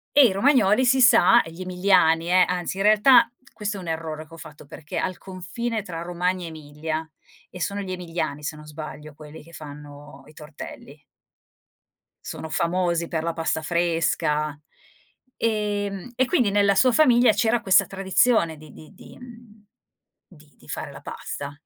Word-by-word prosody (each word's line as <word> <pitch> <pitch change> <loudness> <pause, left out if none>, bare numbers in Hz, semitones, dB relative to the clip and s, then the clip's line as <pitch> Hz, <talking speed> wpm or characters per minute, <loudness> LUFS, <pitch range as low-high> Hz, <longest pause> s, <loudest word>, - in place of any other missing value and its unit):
e 285 -2 +8
i 215 - +1
romagnoli 235 +1 +3
si 260 +1 +3
sa 240 -1 +6
e 165 - -10
gli 175 +3 -9
emiliani 180 -3 +2
eh, 185 0 +5
anzi 180 0 -3
in 195 - -2
realtà 215 +3 +5 0.2
questo 210 -2 -4
è - - -7
un 175 - -8
errore 160 -1 -5
che 165 - -15
ho - - -10
fatto, 150 -2 -13
perché 150 +2 -7
al 185 - -2
confine 215 +5 -5
tra 170 -4 -7
Romagna 180 +1 -2
e - - -5
Emilia, 155 +1 -6 0.4
e 180 - -11
sono 200 +4 -2
gli 190 -2 -5
emiliani, 165 -4 -4
se 150 +1 -5
non 150 0 -13
sbaglio, 150 0 -9
quelli 150 0 -12
che 165 +2 -18
fanno 145 -1 -11
i 150 - -16
tortelli 150 -1 -11 1.2
sono 160 - -6
famosi 170 0 -1
per 160 -1 -3
la 170 - -1
pasta 160 -1 -2
fresca. 165 -3 0 0.8
Ehm, 205 -1 -2
e 255 +2 +2
quindi 245 -4 +2
nella 200 0 +3
sua 255 +4 +4
famiglia 245 -4 +5
c'era 230 +2 +1
questa 190 -5 +4
tradizione 190 -2 +1
di 155 -2 -14
di 155 - -14
di - - -15
mhmm, 230 -4 -15 0.6
di 150 -5 -20
di - - -21
fare - - -6
la - - -11
pasta. 140 0 -7
180 Hz, 170 wpm, -24 LUFS, 155-210 Hz, 1.2 s, e